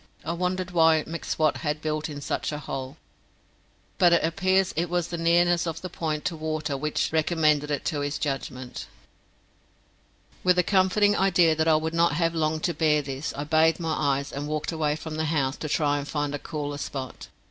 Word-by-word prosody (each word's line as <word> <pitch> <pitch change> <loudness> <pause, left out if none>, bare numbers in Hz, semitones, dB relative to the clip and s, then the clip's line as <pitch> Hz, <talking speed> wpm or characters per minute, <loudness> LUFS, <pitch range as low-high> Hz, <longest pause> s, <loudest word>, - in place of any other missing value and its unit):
I - - -1
wondered 180 +1 -2
why 160 -2 +4
M'Swat 160 -2 -1
had 150 -1 -2
built 155 0 -2
in 145 -1 -7
such - - -2
a 150 - -3
hole, 135 -1 -6 1.0
but 175 -2 +6
it 170 - +4
appears 185 +3 +1
it 170 +1 -1
was 175 -1 -1
the 175 - -3
nearness 170 +1 +3
of 165 0 -4
the 185 - -5
point 155 -2 -3
to 170 - -1
water 155 -2 -3
which 150 +2 -1
recommended 155 -2 +2
it 145 - -2
to 150 - -1
his 145 +1 -2
judgment. 130 -3 -4 1.6
With 180 0 +4
the 180 - +3
comforting 200 +2 +3
idea 175 -5 +4
that 160 +1 +1
I 160 - +5
would 160 +1 -1
not 170 -2 +3
have 165 +1 +1
long 155 -1 0
to 175 - 0
bear 150 -2 +2
this, 135 +2 -4
I 145 - -3
bathed 160 +2 +3
my 165 -2 -1
eyes, 140 -1 0
and 145 +1 -4
walked 155 +2 -2
away 155 -2 0
from 155 0 -6
the 160 - 0
house 145 -3 0
to 155 - -5
try 145 -1 +1
and 140 - -6
find 145 -1 -2
a 145 - -3
cooler 145 -1 -5
spot. 135 -3 -6
155 Hz, 200 wpm, -26 LUFS, 150-170 Hz, 1.6 s, but